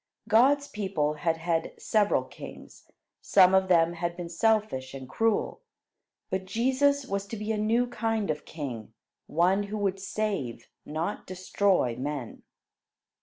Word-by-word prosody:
God's 270 +6 +4
people 190 - -1
had 160 +2 -1
had 165 0 -1
several 210 -2 +2
kings. - - -12 0.3
Some 185 -1 +5
of 190 0 +4
them 170 -2 +4
had 170 0 -3
been 175 -1 -5
selfish 170 -9 0
and 130 -1 -8
cruel, 225 - 0 0.7
but 190 0 -2
Jesus 265 +7 +2
was 200 -5 -3
to 225 - -6
be 210 +1 -3
a 220 - 0
new 230 +3 +2
kind 225 -5 -1
of 150 - -5
king, 125 -8 -7 0.3
one 180 +5 +2
who 205 +1 -4
would 195 -2 -1
save, 195 - -3 0.2
not 160 +7 -3
destroy 185 -7 +1
men. 135 -1 -5
190 Hz, 140 wpm, -28 LUFS, 165-215 Hz, 0.7 s, Some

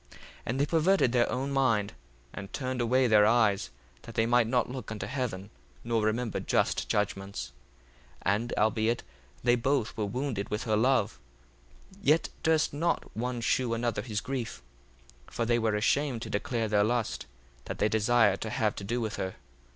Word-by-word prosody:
1:9 - - -15 0.3
And 125 +3 -1
they 140 - +3
perverted 165 -2 +3
their 120 -1 +2
own 135 +2 -2
mind, 115 -7 +1 0.4
and 100 -1 -7
turned 130 -2 -2
away 130 +3 +3
their 105 -3 +6
eyes, 110 -4 +3 0.3
that 115 - -11
they 110 - +3
might 120 -1 +3
not 125 +1 +1
look 125 -4 -7
unto 105 -3 -4
heaven, 105 -5 -4 0.3
nor 115 -1 0
remember 110 +1 0
just - - 0
judgments. 100 -8 -2 0.7
1:10 100 - +4
And 120 +1 -5
albeit 110 +2 +1 0.4
they 120 0 +4
both 125 -1 0
were 105 -3 -1
wounded 120 -3 -3
with 105 - -2
her 110 -2 +1
love, 110 -1 +2 0.8
yet 160 -3 +3
durst 160 -2 +2
not 165 +4 -1
one 120 +1 -2
shew 120 0 +1
another 120 0 -1
his 105 -4 -3
grief. 120 - -4 0.6
1:11 - - -17
For 115 - -1
they 120 0 +2
were 110 -2 +1
ashamed 120 +3 +1
to 110 - -7
declare 115 +2 -1
their 105 -1 +3
lust, 120 +1 -1 0.4
that - - -5
they 105 - +2
desired 110 -1 +3
to 110 - -3
have 110 -3 0
to - - -5
do 120 +5 -1
with 110 -2 -3
her. 95 0 -3
115 Hz, 180 wpm, -29 LUFS, 105-125 Hz, 0.8 s, their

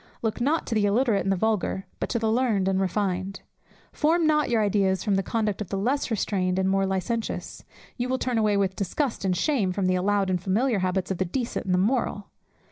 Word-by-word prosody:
Look 225 +1 -1
not 300 +6 +1
to - - -3
the 210 -2 +2
illiterate 225 0 +2
and 195 - 0
the - - +3
vulgar, 205 -1 -1
but - - -2
to 240 - 0
the 220 -1 0
learned 225 -5 +1
and 190 0 +1
refined. 190 0 -2 0.5
Form 325 +2 +2
not 300 -2 +2
your 230 -2 +2
ideas 195 -2 +1
from 205 - +1
the 195 - +2
conduct 215 0 -1
of 205 - -5
the 195 - -2
less 255 +9 0
restrained 190 -4 0
and 190 0 +1
more 195 0 +2
licentious; 205 +4 -3 0.3
you 245 0 -2
will 260 - +1
turn 250 -3 -1
away 210 -2 +2
with 190 -1 0
disgust 225 - -2
and 185 -2 +1
shame 230 - +1
from 190 +1 -1
the 185 - +2
allowed 195 +1 +1
and 180 -2 0
familiar 215 +4 +1
habits 185 +1 -1
of 190 - -3
the 190 - +1
decent 235 +7 -3
and 185 - +1
the - - +2
moral. 205 -1 0
205 Hz, 225 wpm, -26 LUFS, 190-235 Hz, 0.5 s, the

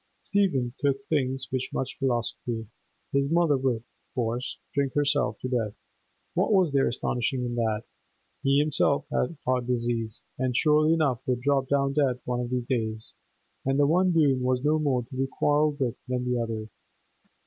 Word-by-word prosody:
Stephen 140 -12 +1
took 135 -1 0
things 135 -3 0
with 130 -1 0
much 130 - -3
philosophy; 120 -2 -1 0.5
his 140 0 +1
mother 165 -2 +3
would, 130 -2 +1
of 110 - -9 0.3
course, 120 +1 -2 0.2
drink 140 -2 0
herself 145 0 +1
to - - -4
death—what 115 - -4
was 185 -6 +4
there 135 -1 +3
astonishing 125 +1 -1
in 120 - -3
that? 115 -2 0 0.6
He 135 0 +3
himself 145 -1 +2
had 160 +5 0
heart 125 -1 +1
disease, 120 -3 -1 0.2
and 130 -2 0
surely 155 +1 +4
enough 140 -7 +1
would 125 -1 0
drop 135 0 +2
down 140 -1 +2
dead 135 -4 +2
one 125 0 -1
of 120 -1 -3
these 125 -1 -1
days; 110 -3 -2 0.5
the 135 +2 +3
one 180 +5 +3
doom 145 -6 +3
was 125 0 +1
no 155 +1 +3
more 135 -5 +1
to 120 - -11
be 135 +1 0
quarrelled 145 +2 +1
with 125 -3 0
than 125 0 -1
the 125 -1 0
other. 110 -2 -3
130 Hz, 170 wpm, -27 LUFS, 120-145 Hz, 0.6 s, was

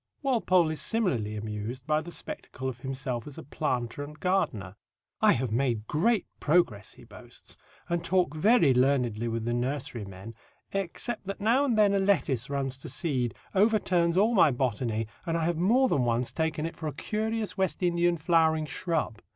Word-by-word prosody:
Walpole 185 - +3
is 155 - -3
similarly 130 - 0
amused 110 +4 -5
by 155 0 +1
the 165 - -9
spectacle 170 - -6
of 125 -2 -5
himself 130 -2 -4
as 145 - -9
a - - -7
planter 125 -2 -2
and 150 +2 -10
gardener. 110 - -1 0.5
"I - - +6
have 120 -1 -2
made 115 -3 0
great 190 - +1
progress," 135 - +1
he - - -15
boasts, - - -13 0.3
"and 170 -1 -1
talk 180 -5 +1
very 205 - +4
learnedly 125 -3 +1
with 115 -1 -2
the 120 - 0
nursery 125 -2 -2
men, 100 +3 -10 0.4
except 195 +4 -3
that 195 - -4
now 235 +7 +3
and 240 -5 +1
then 205 -2 +5
a 200 - +2
lettuce 150 - +1
runs 135 -2 -2
to 135 - -9
seed, 130 -9 -1 0.2
overturns 185 -5 +2
all 215 +5 +4
my 175 -7 +6
botany, 120 -3 -1 0.2
and 165 0 0
I 165 - -1
have 170 -1 0
more 235 +10 +4
than 140 - +1
once 120 +1 0
taken 160 -1 -1
it 165 - -5
for 160 - -5
a 150 - -3
curious 220 +5 -2
West 190 -3 -1
Indian 175 0 +2
flowering 160 -1 +2
shrub. 150 - -2
155 Hz, 180 wpm, -28 LUFS, 125-185 Hz, 0.5 s, I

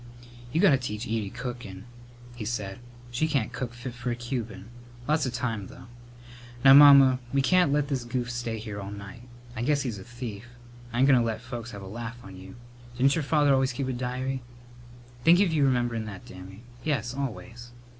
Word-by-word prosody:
"You 160 - 0
got 195 -2 +6
to 135 - +4
teach 110 -2 -4
Edie 110 -4 -2
cookin'," 120 -6 -7 0.5
he 120 - -6
said. 105 -2 -4 0.3
"She 130 +6 0
can't 135 -8 -1
cook 125 -1 -4
fit 120 +1 -7
for 125 0 -5
a 120 - -1
Cuban. 120 -5 -5 0.4
Lots 150 -2 +2
of 125 - -4
time, 115 -5 -3
though. 130 - -13 0.8
Now, 135 - +10
Mamma, 140 -2 +8
we 140 -1 +2
can't 180 -1 +4
let 145 0 +1
this 135 -4 -2
goof 120 0 -3
stay 120 -2 -3
here 105 -2 -6
all 100 - -6
night. 100 +1 -9 0.3
I 120 - -4
guess 145 +3 +1
he's 115 -6 -4
a - - -9
thief. 120 -2 -7 0.5
I 115 - -4
ain't 130 +2 +4
goin' 135 -3 +6
to - - +2
let 115 -1 -1
the 115 - -17
folks 120 -2 -6
have 100 -4 -8
a - - -8
laugh 115 +4 -6
on 95 -1 -11
you. 95 0 -11 0.4
Didn't 135 +2 +4
your 165 - -1
father 145 -1 +3
always 135 0 +2
keep 135 +1 -3
a - - -1
diary?" 130 +2 -3 0.8
"Think 170 +2 +6
of 190 -5 +3
your 145 -3 +3
rememberin' 120 -3 0
that, 100 -3 -9
Dammy! 95 +4 -11 0.2
Yes, 125 -6 -1
always." 120 -3 -6
120 Hz, 205 wpm, -27 LUFS, 110-135 Hz, 0.8 s, Now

